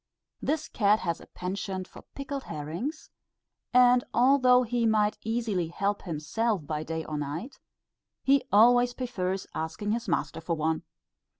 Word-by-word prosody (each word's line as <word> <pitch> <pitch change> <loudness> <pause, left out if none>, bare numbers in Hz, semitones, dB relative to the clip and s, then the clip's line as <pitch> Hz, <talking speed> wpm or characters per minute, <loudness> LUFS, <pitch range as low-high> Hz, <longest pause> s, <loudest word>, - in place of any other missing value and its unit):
This 310 +1 -1
cat 210 0 +2
has 170 -2 -2
a - - -14
penchant 190 0 -4
for - - -13
pickled 275 0 -5
herrings; 165 - -5 0.6
and 250 0 +6
although 255 0 +5
he 240 -1 0
might 215 -1 +2
easily 220 -6 -1
help 200 +4 -1
himself 175 +4 -2
by 150 0 -3
day 160 +1 -4
or 150 -1 -4
night, 160 - -5 0.6
he 275 0 +4
always 245 +3 +5
prefers 195 -7 -2
asking 160 +7 -3
his 235 +2 -2
master 165 - -1
for 165 +1 -1
one. 160 0 0
210 Hz, 140 wpm, -28 LUFS, 165-245 Hz, 0.6 s, and